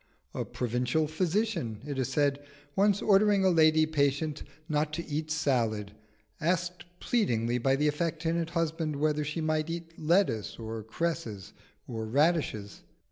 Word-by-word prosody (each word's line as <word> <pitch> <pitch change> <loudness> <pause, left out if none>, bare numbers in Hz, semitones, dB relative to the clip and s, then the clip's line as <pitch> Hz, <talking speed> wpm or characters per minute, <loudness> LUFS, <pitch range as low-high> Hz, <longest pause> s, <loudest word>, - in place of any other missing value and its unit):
A - - -2
provincial 125 +5 0
physician, 165 - -1
it 140 -2 -4
is 130 - 0
said, 145 +1 +1 0.3
once 200 0 +3
ordering 200 -1 +4
a 190 - +5
lady 155 -1 +5
patient 145 0 0 0.3
not 150 -1 0
to 170 +2 -3
eat 155 +1 -3
salad, 115 -9 0
was 105 - -23 0.6
asked 175 0 -5
pleadingly 120 - +1
by 135 +2 +2
the 150 +2 +1
affectionate 165 +2 -1
husband 165 -2 -1
whether 150 +1 +1
she 150 +3 -3
might 155 0 0
eat 165 0 -6
lettuce, 155 - +1
or 110 -1 -5
cresses, 110 - -4 0.3
or 110 -4 -4
radishes. 140 -6 +1
155 Hz, 140 wpm, -29 LUFS, 125-165 Hz, 0.6 s, a